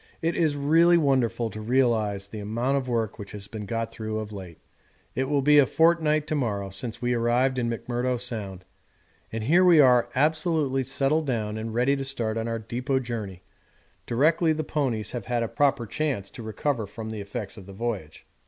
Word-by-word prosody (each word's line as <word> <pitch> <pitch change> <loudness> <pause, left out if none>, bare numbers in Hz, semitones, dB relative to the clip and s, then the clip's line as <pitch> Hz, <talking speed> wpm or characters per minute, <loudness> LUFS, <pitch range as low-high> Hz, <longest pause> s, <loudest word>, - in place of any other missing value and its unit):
It 165 0 -1
is 155 -3 +2
really 165 +5 +4
wonderful 120 -6 +1
to 110 - -7
realise 110 -4 +1
the 105 +1 -8
amount 115 +6 -1
of 135 -2 -1
work 115 -3 -1
which 100 -1 -8
has 100 -1 -6
been 105 0 -7
got 115 +1 -2
through 110 -1 -4
of 110 -1 -5
late. 95 -5 -9 0.6
It 130 - 0
will 140 0 +1
be 150 +1 +6
a 135 - +5
fortnight 160 -2 +3
to - - -3
morrow 100 -8 -2
since 115 +5 -5
we 120 0 +1
arrived 120 +2 +2
in 120 -1 0
McMurdo 120 +2 -2
Sound, 105 -7 -5 0.7
and 115 -1 -3
here 170 +10 +4
we 175 -3 +7
are 125 -4 +5
absolutely 155 -1 +1
settled 140 +4 0
down 110 -4 -1
and 110 +1 -4
ready 125 +4 +3
to 135 - -3
start 115 -5 -2
on 115 0 -2
our 115 0 -1
depôt 125 +4 -2
journey 105 -7 -5 0.6
directly 155 +6 +3
the 155 0 -2
ponies 130 -9 -1
have 120 -5 -5
had 120 -1 0
a - - -1
proper 135 -2 +1
chance 125 -5 -2
to - - -9
recover 110 +1 -2
from 110 +2 -7
the 110 -2 -5
effects 100 +1 -6
of 100 -4 -12
the 100 - -10
voyage. 100 -7 -5
120 Hz, 200 wpm, -26 LUFS, 110-140 Hz, 0.7 s, we